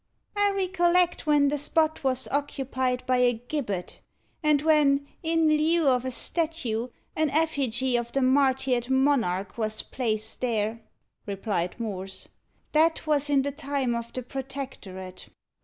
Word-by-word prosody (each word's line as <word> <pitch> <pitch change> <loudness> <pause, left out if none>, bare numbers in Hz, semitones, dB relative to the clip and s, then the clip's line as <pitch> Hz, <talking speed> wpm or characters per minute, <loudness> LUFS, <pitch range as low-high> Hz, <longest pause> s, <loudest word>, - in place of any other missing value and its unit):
"I 410 0 +3
recollect 360 -3 +2
when 290 -2 +4
the 295 0 -1
spot 315 +2 +1
was 260 -1 +1
occupied 260 -3 -1
by 255 0 +2
a 250 0 +4
gibbet, 230 - -4 0.4
and 305 -2 +3
when, 290 -3 +4 0.2
in 325 0 +2
lieu 310 +1 +3
of 250 -1 +3
a - - -1
statue, 255 -5 -1 0.3
an 310 -1 +1
effigy 265 -5 0
of 235 0 -3
the 275 - +1
martyred 260 -2 +2
monarch 240 -8 +1
was 215 -1 -1
placed 220 -3 -2
there," 225 -2 -1 0.5
replied 195 -2 -2
Morse. 195 -4 -5 0.4
"That 320 +1 +3
was 295 -2 +1
in 280 -2 +3
the 285 - -2
time 280 -3 -2
of 235 0 -4
the 255 - -5
Protectorate." 250 -9 -7
265 Hz, 140 wpm, -27 LUFS, 235-300 Hz, 0.5 s, when